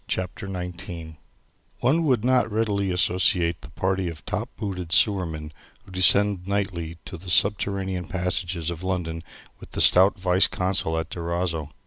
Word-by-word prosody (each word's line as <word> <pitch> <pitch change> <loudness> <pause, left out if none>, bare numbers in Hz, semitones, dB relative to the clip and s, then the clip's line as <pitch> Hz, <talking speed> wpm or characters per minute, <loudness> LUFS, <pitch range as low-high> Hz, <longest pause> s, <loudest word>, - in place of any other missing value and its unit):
CHAPTER 95 +2 -4
XIX 90 -3 -7 0.6
One 160 +5 +3
would 125 -6 +2
not 125 -3 +3
readily 105 -3 0
associate 90 -2 +2
the - - -11
party 95 +3 -1
of 80 - -10
top - - -3
booted 90 -5 -5
sewermen 85 -7 +2 0.3
who - - -15
descend 95 0 +4
nightly 95 -5 -2
to 90 - -8
the 90 +1 -9
subterranean 95 -1 +1
passages 90 -2 -1
of 85 -1 -7
London 90 -3 -3 0.4
with - - -14
the - - -3
stout 95 +2 +5
viceconsul 90 -2 +1
at 80 -1 -6
Durazzo. 85 -2 -2
90 Hz, 140 wpm, -24 LUFS, 85-100 Hz, 0.6 s, stout